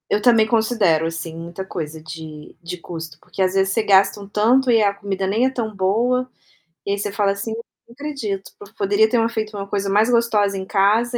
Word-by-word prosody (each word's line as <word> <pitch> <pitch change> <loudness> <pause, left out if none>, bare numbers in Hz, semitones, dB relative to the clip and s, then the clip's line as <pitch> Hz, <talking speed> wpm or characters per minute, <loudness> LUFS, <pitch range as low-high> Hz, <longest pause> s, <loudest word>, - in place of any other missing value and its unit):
Eu 210 - +2
também 230 -2 +5
considero, 220 -8 +2
assim, 165 0 -5
muita 170 +3 -6
coisa 160 -3 -6
de 155 -1 -9
de 175 +1 -6
custo, 165 -3 -8
porque - - -6
às 185 0 +2
vezes 195 0 +2
você 225 - +2
gasta 200 -1 +4
um 200 - -9
tanto, 240 +6 +3
e 225 -2 +5
a 200 -1 +2
comida 200 -1 -3
nem 215 +6 +2
é - - +3
tão 230 -4 -4
boa. 235 +7 +1 0.6
E 200 - -1
aí 200 - 0
você 205 0 -3
fala 200 -1 +2
assim: 200 +3 -4
"Não 230 0 -13
acredito, 240 -8 -5
p 205 +1 -13
poderia 205 +2 +3
termos 230 -1 +2
feito 215 -2 -4
uma 200 -1 -4
coisa 200 0 -2
mais 210 +4 +3
gostosa 220 -4 +2
em 190 - -5
casa, 215 +5 +2
200 Hz, 215 wpm, -21 LUFS, 190-225 Hz, 0.6 s, também